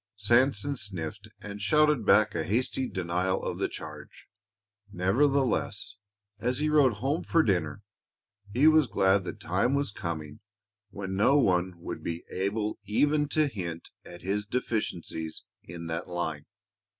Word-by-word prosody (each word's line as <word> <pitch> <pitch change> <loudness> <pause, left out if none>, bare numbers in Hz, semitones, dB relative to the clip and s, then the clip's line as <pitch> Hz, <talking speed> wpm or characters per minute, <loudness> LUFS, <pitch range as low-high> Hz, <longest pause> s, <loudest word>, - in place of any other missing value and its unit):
Sanson 120 +5 +2
sniffed 100 - -5
and 105 0 -7
shouted 150 +2 +3
back 105 0 +5
a 85 - -1
hasty 125 +7 -1
denial 90 +1 -1
of - - -3
the - - 0
charge. - - -9 0.6
Nevertheless, 125 +7 +1 0.4
as 125 +3 0
he 150 +2 +1
rode 145 -5 +5
home 135 - -1
for 165 - +3
dinner 90 -1 0 0.7
he 125 +8 +3
was 155 -3 +6
glad 95 -1 +2
the - - -2
time 95 +10 0
was 140 -5 0
coming 80 -6 -5 0.5
when 95 -2 -5
no 120 +9 +4
one 90 -7 +2
would 85 - -6
be 85 0 -4
able 105 +3 -2
even 145 +8 +2
to 155 +1 +2
hint 85 - -5
at 85 -1 -12
his 100 +3 -1
deficiencies 100 -9 -3 0.2
in 85 0 -8
that 80 0 -4
line. 80 -4 -3
100 Hz, 140 wpm, -28 LUFS, 90-130 Hz, 0.7 s, was